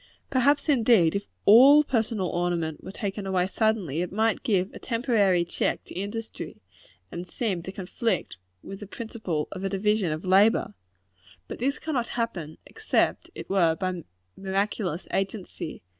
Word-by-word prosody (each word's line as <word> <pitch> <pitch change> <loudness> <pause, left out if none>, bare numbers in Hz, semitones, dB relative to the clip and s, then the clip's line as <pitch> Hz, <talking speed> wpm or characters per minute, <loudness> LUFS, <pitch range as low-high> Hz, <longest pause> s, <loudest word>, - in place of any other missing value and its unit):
Perhaps, 280 +3 +3
indeed, 230 - +4
if 200 0 -3 0.2
all 270 +8 +8
personal 225 -8 0
ornament 170 -3 -2
were - - -8
to - - -16
be - - -10
taken 200 -1 -3
away 185 -2 +1
suddenly, 195 - 0
it 180 - -3
might 220 +3 +1
give 190 -4 0
a - - -9
temporary 220 -8 +2
check 175 - -1
to - - -12
industry, 205 - -6 0.5
and 175 +1 -6
seem 195 -6 -2
to 185 - -7
conflict 195 - -2 0.3
with 195 - -8
the 205 - -8
principal 215 -9 -4
of 190 -1 -6
a 195 - 0
division 200 -2 +1
of 155 +4 -4
labor. 195 - +4 0.7
But - - -7
this 275 +4 0
cannot 265 -7 -2
happen, 180 -10 -3
except 440 -1 0
it - - -8
were 170 -4 +3
by 180 0 -3 0.3
miraculous 195 -2 -2
agency. 195 - -4
195 Hz, 160 wpm, -26 LUFS, 180-225 Hz, 0.7 s, all